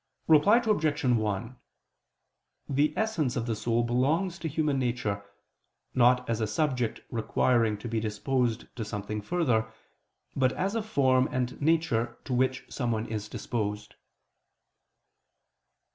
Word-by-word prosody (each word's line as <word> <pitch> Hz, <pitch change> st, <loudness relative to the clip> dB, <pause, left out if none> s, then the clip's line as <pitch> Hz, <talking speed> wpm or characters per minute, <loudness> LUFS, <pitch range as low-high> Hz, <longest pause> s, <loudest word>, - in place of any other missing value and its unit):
Reply 160 Hz, +8 st, +6 dB
Obj. 160 Hz, -11 st, +1 dB
1: 115 Hz, -1 st, 0 dB, 1.1 s
The 145 Hz, +2 st, +2 dB
essence 175 Hz, -, 0 dB
of 115 Hz, -, -1 dB
the 115 Hz, -2 st, -1 dB
soul 115 Hz, +2 st, 0 dB
belongs 155 Hz, +10 st, +1 dB
to 165 Hz, -, -3 dB
human 150 Hz, -2 st, 0 dB
nature, 120 Hz, -5 st, -1 dB, 0.7 s
not 125 Hz, 0 st, +4 dB
as 115 Hz, -1 st, -1 dB
a 110 Hz, -, +1 dB
subject 125 Hz, -1 st, -1 dB
requiring 115 Hz, -1 st, +1 dB
to 105 Hz, -, -7 dB
be 115 Hz, -1 st, -1 dB
disposed 115 Hz, +2 st, -1 dB
to 115 Hz, -, -2 dB
something 105 Hz, 0 st, -4 dB
further, 115 Hz, -, 0 dB, 0.6 s
but 130 Hz, -1 st, +2 dB
as 195 Hz, +2 st, -1 dB
a 225 Hz, -, 0 dB
form 130 Hz, -11 st, +2 dB
and 125 Hz, +1 st, -2 dB
nature 145 Hz, -7 st, +1 dB
to 130 Hz, -, -4 dB
which 130 Hz, +1 st, +1 dB
someone 115 Hz, -4 st, -2 dB
is 110 Hz, -2 st, -5 dB
disposed. 105 Hz, -3 st, -3 dB
125 Hz, 130 wpm, -28 LUFS, 110-150 Hz, 1.1 s, Reply